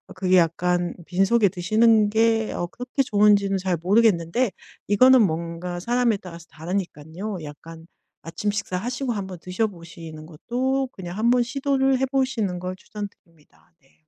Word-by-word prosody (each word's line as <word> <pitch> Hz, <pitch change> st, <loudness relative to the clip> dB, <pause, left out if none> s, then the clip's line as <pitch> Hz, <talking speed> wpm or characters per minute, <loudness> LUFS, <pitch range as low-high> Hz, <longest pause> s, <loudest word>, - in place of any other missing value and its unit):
그게 185 Hz, -1 st, +2 dB
약간 175 Hz, +1 st, +1 dB
빈속에 195 Hz, +3 st, +3 dB
드시는 215 Hz, +4 st, +3 dB
게 225 Hz, 0 st, +2 dB
어 175 Hz, -, -2 dB
그렇게 250 Hz, +7 st, -2 dB
좋은지는 205 Hz, -3 st, +3 dB
잘 185 Hz, -1 st, -1 dB
모르겠는데 200 Hz, +2 st, +2 dB, 0.4 s
이거는 255 Hz, +5 st, +6 dB
뭔가 170 Hz, -1 st, -2 dB
사람에 240 Hz, -1 st, +1 dB
따라서 170 Hz, -3 st, -11 dB
다르니깐요. 175 Hz, +2 st, -5 dB
약간 160 Hz, +2 st, -11 dB, 0.4 s
아침 205 Hz, +5 st, -3 dB
식사하시고 230 Hz, +6 st, -3 dB
한번 190 Hz, -5 st, -5 dB
드셔 185 Hz, +6 st, -1 dB
보시는 165 Hz, -4 st, -11 dB
것도 255 Hz, -, -2 dB
그냥 180 Hz, 0 st, -8 dB
한번 240 Hz, +2 st, +3 dB
시도를 270 Hz, +1 st, +1 dB
해 265 Hz, -, +2 dB
보시는 255 Hz, -9 st, -1 dB
걸 185 Hz, +1 st, -5 dB
추천드립니다. 185 Hz, -6 st, -12 dB
네. 135 Hz, -, -30 dB
195 Hz, 335 characters per minute, -23 LUFS, 175-230 Hz, 0.4 s, 이거는